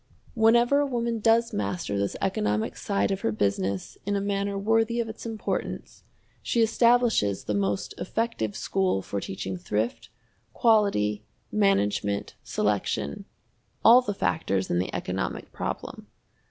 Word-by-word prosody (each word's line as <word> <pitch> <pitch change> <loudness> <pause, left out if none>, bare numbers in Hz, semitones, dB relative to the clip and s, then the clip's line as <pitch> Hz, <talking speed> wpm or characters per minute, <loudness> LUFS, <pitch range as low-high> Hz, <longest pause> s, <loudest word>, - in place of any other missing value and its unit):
Whenever 235 +4 +4
a 290 - +2
woman 235 -3 -1
does 230 +1 +3
master 180 - -2
this 100 0 -1
economic 105 - 0
side 200 -1 0
of 195 0 -2
her - - 0
business 100 -2 -1
in 205 +1 -1
a - - +1
manner 200 0 -1
worthy 225 +3 +1
of 230 - -1
its 220 +1 -7
importance, 220 -2 -4 0.4
she 235 - +2
establishes 230 - +3
the 105 - -2
most 100 0 -1
effective 190 - -2
school 185 - 0
for 100 - -4
teaching 95 -1 -5
thrift, 105 +6 -2 0.4
quality, 200 - +2 0.3
management, 105 - +1
selection 70 - -1 0.6
all 240 +3 +9
the 205 -5 -3
factors 95 - 0
in 85 - +2
the 90 - -2
economic 95 +1 -3
problem. - - -5
195 Hz, 135 wpm, -26 LUFS, -, 0.6 s, all